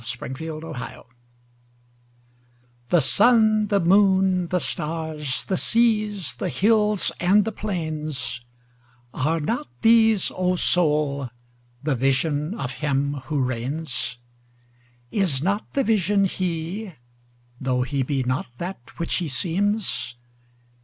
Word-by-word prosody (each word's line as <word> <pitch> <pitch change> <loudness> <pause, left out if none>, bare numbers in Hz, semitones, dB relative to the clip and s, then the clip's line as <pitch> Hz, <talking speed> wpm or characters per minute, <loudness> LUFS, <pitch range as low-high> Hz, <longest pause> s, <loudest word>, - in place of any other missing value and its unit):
The - - -11
Higher 120 - -4
Pantheism 155 -2 -6 1.9
THE 175 - +5
SUN, 215 - +4
the 200 -1 +2
moon, 190 0 +4
the 180 - 0
stars, 155 -4 -3
the 190 - -1
seas, 215 -6 +1
the - - -2
hills 210 -1 +2
and 195 +4 +4
the 225 - -2
plains—Are 130 - -5
not 160 - -2 0.2
these, 225 -2 +5
O 185 0 +1
Soul, 150 -7 +2 0.5
the 150 -1 +1
Vision 145 - 0
of 130 - -4
Him 140 -1 0
who 145 -1 0
reigns? 130 +1 -3 0.9
Is 170 -10 +1
not 200 +4 -1
the 275 - +3
Vision 205 -3 +2
He? 180 +2 -3 0.7
tho' 130 -1 0
He 140 +1 -2
be 135 0 0
not 130 +1 -1
that 175 -8 -7
which 170 - 0
He 175 - -2
seems? 165 - -1
165 Hz, 110 wpm, -24 LUFS, 135-200 Hz, 1.9 s, THE